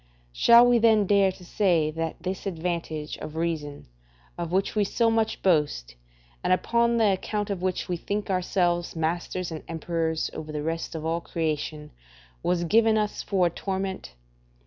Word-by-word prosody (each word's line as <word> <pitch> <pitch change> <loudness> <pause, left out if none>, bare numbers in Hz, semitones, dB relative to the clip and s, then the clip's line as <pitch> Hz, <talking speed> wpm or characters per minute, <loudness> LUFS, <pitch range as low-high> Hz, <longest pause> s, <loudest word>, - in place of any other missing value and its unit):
Shall 235 - +7
we 245 -1 +4
then 220 -2 +4
dare 195 -1 +4
to 180 - -14
say 170 -5 +2
that 165 0 -4
this 190 +2 -4
advantage 165 -3 -3
of 155 - -7
reason, 160 -3 -3 0.5
of 170 -1 -4
which 190 +2 +1
we 210 - +3
so 230 +3 +1
much 225 -1 0
boast, 150 - +1 0.5
and - - +1
upon 235 +5 +2
the 220 -3 +4
account 205 +2 -2
of 190 -3 -3
which 185 -1 -1
we 180 - -2
think 205 +4 -3
ourselves 175 -2 0
masters 170 +2 -2
and 160 - -5
emperors 165 -1 -2
over 155 -1 -6
the 150 -1 -4
rest 165 +1 -3
of 160 -1 -5
all 165 +1 -1
creation, 155 -2 -3 0.5
was 175 -1 0
given 220 +5 +4
us 210 -1 -1
for 190 -3 +1
a - - +3
torment? 190 - -4
175 Hz, 170 wpm, -26 LUFS, 160-200 Hz, 0.5 s, Shall